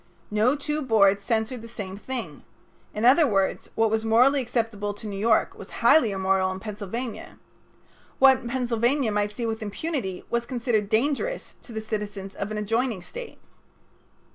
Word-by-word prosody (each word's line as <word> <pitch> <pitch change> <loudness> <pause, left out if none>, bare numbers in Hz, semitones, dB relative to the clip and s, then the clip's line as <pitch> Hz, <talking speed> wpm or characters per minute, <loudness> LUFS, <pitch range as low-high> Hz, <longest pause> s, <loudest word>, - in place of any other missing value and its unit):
No 220 +6 +3
two 300 +1 -2
boards 200 -6 +4
censored 225 +1 -1
the 230 - -9
same 205 -5 -7
thing. 245 +4 -6 0.5
In 215 +2 -2
other 280 +5 +6
words, 195 -4 0
what 225 -1 +2
was 220 0 +1
morally 250 +5 +4
acceptable 225 -4 -2
to 205 - -11
New 205 -2 -4
York 220 +1 +2
was - - -11 0.2
highly 310 -8 +6
immoral 190 -1 +1
in 185 - -5
Pennsylvania. 215 +3 -6 0.8
What 265 -3 +5
Pennsylvania 240 0 +1
might 205 0 0
see 235 +3 -4
with 225 0 -3
impunity 210 - -4
was 235 0 -1
considered 235 -5 0
dangerous 290 - 0
to - - -14
the 220 -1 -4
citizens 205 -3 -5
of 200 - -4
an 215 - -4
adjoining 225 -1 -1
State. 485 - -9
225 Hz, 160 wpm, -25 LUFS, 205-250 Hz, 0.8 s, other